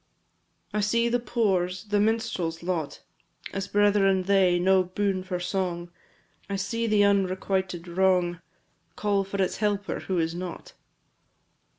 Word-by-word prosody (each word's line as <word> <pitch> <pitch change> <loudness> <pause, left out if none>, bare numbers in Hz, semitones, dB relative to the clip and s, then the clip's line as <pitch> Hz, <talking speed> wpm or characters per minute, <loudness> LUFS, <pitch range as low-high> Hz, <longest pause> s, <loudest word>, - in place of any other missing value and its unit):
I 210 - 0
see 235 +3 +2
the 245 +1 +1
poor's 190 -7 0
the 205 -1 0
minstrel's 210 -7 -1
lot 170 -5 -3 0.5
As 195 0 -3
brethren 200 -2 +3
they 190 -2 +3
no 190 +1 +4
boon 190 +1 -1
for 185 -1 -4
song! 175 -1 -3 0.6
I 200 - -1
see 215 +4 -2
the 210 -2 +4
unrequited 190 -2 0
wrong 180 -1 +1 0.5
Call 200 -1 +1
for 195 +1 -5
its 190 - 0
helper, 205 -2 -1
who 185 - -3
is 165 0 0
not. 185 - -7
190 Hz, 130 wpm, -26 LUFS, 180-205 Hz, 0.6 s, no